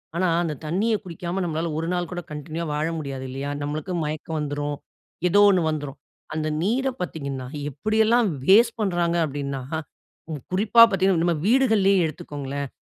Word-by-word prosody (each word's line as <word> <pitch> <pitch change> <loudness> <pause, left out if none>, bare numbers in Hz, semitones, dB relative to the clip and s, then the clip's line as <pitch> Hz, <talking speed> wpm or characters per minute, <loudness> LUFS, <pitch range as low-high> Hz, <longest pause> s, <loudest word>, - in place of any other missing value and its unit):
ஆனா, 185 +2 +2 0.2
அந்த 160 -3 -2
தண்ணிய 195 +9 +1
குடிக்காம, 180 +1 -4
நம்மளால 165 -1 -2
1 165 +1 -2
நாள் 175 -2 -2
கூட 175 -1 -4
கன்டின்யூவா 155 +3 -5
வாழ 150 +2 0
முடியாது 135 -3 -5
இல்லையா? 135 +2 -4
நம்மளுக்கு 155 +6 -3
மயக்கம் 155 +2 -4
வந்துரும். 145 0 -3 0.5
ஏதோ 205 - +4
ஒண்ணு 185 -3 +3
வந்துரும். 145 -3 -4 0.4
அந்த 155 0 -2
நீர 240 +9 +1
பாத்தீங்கன்னா, 140 -7 -4 0.2
எப்படி 215 +11 -2
எல்லாம் 235 +1 +4 0.2
வேஸ்ட் 225 +6 +5
பண்றாங்க? 175 -4 +1
அப்டினா, 140 -2 -4 0.7
ம் 150 -3 -5
குறிப்பா 210 +5 +5
பாத்தீங்கன்னா, 190 -3 +2
நம்ம 170 -1 +2
வீடுகள்லேயே 215 -7 +4
எடுத்துக்கோங்களேன். 140 -2 -5
165 Hz, 150 wpm, -24 LUFS, 145-190 Hz, 0.7 s, வேஸ்ட்